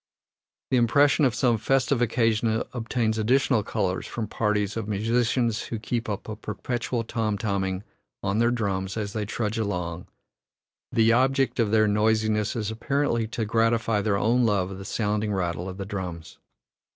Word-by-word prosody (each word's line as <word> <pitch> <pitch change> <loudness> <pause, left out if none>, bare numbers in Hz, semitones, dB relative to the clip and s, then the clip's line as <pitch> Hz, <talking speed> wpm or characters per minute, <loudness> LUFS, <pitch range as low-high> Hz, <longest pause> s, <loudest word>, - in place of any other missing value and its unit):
The 130 - +4
impression 140 +5 +4
of 125 -3 +1
some 120 -3 +2
festive 135 +3 +1
occasion 115 -1 +1
obtains 115 -2 -1
additional 125 +1 +3
color 95 -2 -1
from 115 - -4
parties 105 -1 0
of 110 -2 -3
musicians 115 +2 0
who 115 - -4
keep 115 +2 -3
up 100 - -4
a 110 - -4
perpetual 115 +3 -3
tom 110 -2 -1
tom 100 -2 -1
ing 95 +1 -3 0.4
on 100 +3 0
their 120 0 +4
drums 100 -4 -2
as 105 -2 -3
they 105 -2 -3
trudge 110 0 -2
along; 90 -5 -3 0.8
the 115 0 +4
object 135 +1 +2
of 115 -3 +3
their 110 0 +4
noisiness 105 0 +1
is 110 -2 -2
apparently 120 -1 0
to 115 -1 -3
gratify 115 -1 +2
their 100 -1 +1
own 120 +4 +2
love 100 -4 +1
of 95 - -7
the 95 - -8
sounding 105 0 -1
rattle 90 -1 -2
of 95 - -8
the 100 - -4
drums. 90 -4 -6
110 Hz, 165 wpm, -26 LUFS, 100-120 Hz, 0.8 s, The